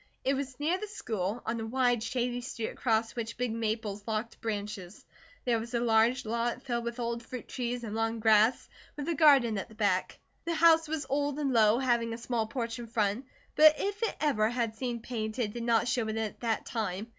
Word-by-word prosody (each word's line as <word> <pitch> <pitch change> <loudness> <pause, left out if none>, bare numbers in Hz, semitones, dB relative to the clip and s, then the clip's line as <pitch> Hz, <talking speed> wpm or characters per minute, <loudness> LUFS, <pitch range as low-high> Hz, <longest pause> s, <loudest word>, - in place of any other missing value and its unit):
It 270 - +2
was 270 -1 -4
near 330 +5 +1
the 425 - -5
school, 220 - -3
on 230 +1 -2
a 225 - -3
wide 245 -1 +2
shady 245 +1 -2
street 235 -2 -4
across 225 -2 0
which 230 -1 -4
big 250 -1 -1
maples 220 -2 -2
locked 220 +1 -3
branches. 205 -3 -5 0.4
There 235 -2 +2
was 235 +2 -5
a - - +2
large 235 +3 +3
lot 235 +3 -1
filled 240 -3 -2
with 235 +1 -4
old 235 0 -2
fruit 245 +1 -8
trees 245 -1 -3
and 215 -2 -5
long 225 +1 -1
grass, 220 +2 +4 0.3
with 290 - -4
a 340 - +1
garden 275 -9 +5
at 195 - -6
the 220 - -15
back. 200 -4 0 0.3
The 335 0 -1
house 325 -1 +5
was 310 -1 -3
old 285 +1 0
and 280 -3 0
low, 220 -1 +5
having 235 -3 +1
a - - -8
small 235 -2 -2
porch 230 -1 -4
in 235 - -7
front, 220 +2 -1 0.3
but 310 0 +8
if 405 +2 -3
it 455 - 0
ever 220 -8 +2
had 235 -2 -1
seen 240 -1 -3
paint, 220 -2 -4
it 215 -5 -1
did 240 - -5
not 230 -1 +2
show 235 -2 0
it 220 0 -3
at 220 -2 -3
that 230 -2 -1
time. 210 -3 -3
235 Hz, 215 wpm, -30 LUFS, 220-255 Hz, 0.4 s, but